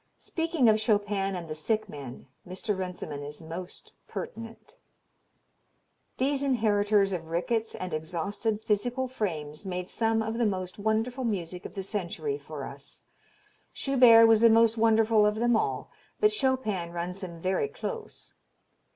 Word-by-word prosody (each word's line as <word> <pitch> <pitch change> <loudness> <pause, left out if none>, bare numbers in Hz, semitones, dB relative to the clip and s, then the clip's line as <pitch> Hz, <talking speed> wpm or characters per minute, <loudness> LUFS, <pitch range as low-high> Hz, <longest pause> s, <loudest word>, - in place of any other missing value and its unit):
Speaking 325 -6 0
of 215 0 +5
"Chopin 205 -3 +1
and 175 -2 -5
the 155 - -4
Sick 215 +8 -1
Men" 140 -8 -9 0.2
Mr. 190 +4 -3
Runciman 180 -6 -5
is 145 +1 -8
most 170 +2 -8
pertinent: 230 - -8 1.4
"These 275 +1 +1
inheritors 210 -6 +2
of 165 -3 -4
rickets 220 +7 -1
and 185 -2 -5
exhausted 200 +7 -2
physical 245 +5 0
frames 160 -11 -4
made 180 -1 -4
some 225 -1 +1
of 225 +1 -3
the 235 - +3
most 185 -1 -3
wonderful 225 +5 0
music 180 -6 -3
of - - -18
the 195 - -3
century 210 - -3
for - - -7
us. - - -10 0.7
Schubert 245 -4 +6
was 225 -1 +5
the 230 - +8
most 225 0 +5
wonderful 225 -1 +4
of 210 0 +3
them 240 +1 +2
all, - - -1 0.3
but 425 0 +4
Chopin 255 - 0
runs 175 +2 -4
him 170 -2 -7
very 185 - 0
close. 450 +1 -7
210 Hz, 145 wpm, -28 LUFS, 180-230 Hz, 1.4 s, the